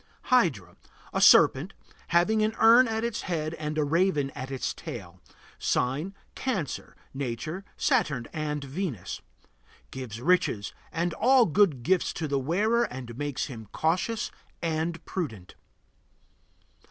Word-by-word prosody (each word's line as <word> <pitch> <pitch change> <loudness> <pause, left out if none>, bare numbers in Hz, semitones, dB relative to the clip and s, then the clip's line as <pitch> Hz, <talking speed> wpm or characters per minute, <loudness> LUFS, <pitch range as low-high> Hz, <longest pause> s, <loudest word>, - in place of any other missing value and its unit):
HYDRA. 120 - +2 0.4
A - - 0
serpent, 155 +9 +6 0.3
having 180 +6 +3
an 215 +1 +1
urn 235 +3 +7
at 220 0 -2
its 235 -2 -2
head 160 -3 -2
and 155 -1 -4
a 155 - +3
raven 150 -2 +1
at 130 0 -7
its 135 -1 -2
tail. 95 - -9 0.4
Sign: 150 +10 0 0.2
Cancer. 200 - -3 0.2
Nature: 140 +7 -4
Saturn 155 - +1
and 150 -2 -2
Venus. 140 - -4 0.7
Gives 125 -4 -6
riches 130 - +1 0.2
and 170 +1 -1
all 255 +3 +5
good 165 - +2
gifts 185 +4 +2
to 160 - -3
the 140 -1 0
wearer 210 - +2
and 125 - -7
makes 145 0 -2
him 115 -6 -9
cautious 185 +8 0 0.3
and 165 0 -2
prudent. 110 - -5
155 Hz, 130 wpm, -27 LUFS, 130-190 Hz, 0.7 s, urn